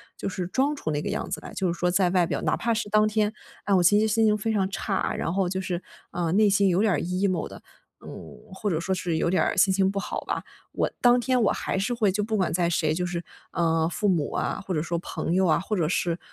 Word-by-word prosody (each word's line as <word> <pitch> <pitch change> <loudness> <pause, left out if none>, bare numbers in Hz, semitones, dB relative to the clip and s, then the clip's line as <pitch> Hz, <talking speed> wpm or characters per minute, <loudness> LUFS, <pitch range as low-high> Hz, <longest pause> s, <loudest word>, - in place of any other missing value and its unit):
就 - - -4
是 185 -2 -4
装 275 +9 0
出 160 - -4
那 145 0 -1
个 - - -4
样 - - -3
子 - - -3
来。 - - -9
就 185 -3 0
是 - - -11
说 180 - +2
在 180 0 +2
外 180 -2 +3
表 - - -2
哪 - - +1
怕 235 - -1
是 220 -1 -2
当 215 0 +4
天， 215 0 0 0.3
啊， 200 - +2
我 - - +3
心 205 +4 +5
情 220 - +2
心 220 +1 +2
情 215 -1 +3
非 220 +2 -1
常 195 -2 +1
差， 195 0 -2
然 165 - -2
后 190 -2 +1
就 190 0 -2
是， 180 -1 -3 0.3
啊， 175 -2 -2
内 210 +3 +4
心 195 0 +3
有 180 +3 +2
点 215 -3 +3
儿 - - +1
emo 185 -1 -1
的， - - -11 0.4
嗯， - - -8 0.4
或 205 +2 -3
者 160 - 0
说 190 +3 -1
是 175 -3 -1
有 - - 0
点 185 - +2
儿 - - -1
心 190 0 +4
情 190 0 +2
不 200 - -4
好 - - -4
吧。 - - -3 0.3
我 - - 0
当 245 0 +5
天 250 +1 +1
我 210 - +3
还 - - -2
是 205 +6 -1
会 215 -4 +2
就 210 +2 -1
不 215 0 -1
管 185 - 0
在 170 0 +1
谁 155 -2 +1
就 180 +2 -1
是， 175 -1 -4 0.3
嗯， 165 -1 +2
父 205 +4 -1
母 170 -7 +1
啊， - - -2
或 - - -5
者 150 - 0
说 170 0 -2
朋 170 - -3
友 190 0 +3
啊， 160 - +4
或 210 +4 -3
者 165 -5 0
是 175 -1 0
190 Hz, 305 characters per minute, -25 LUFS, 175-210 Hz, 0.4 s, 心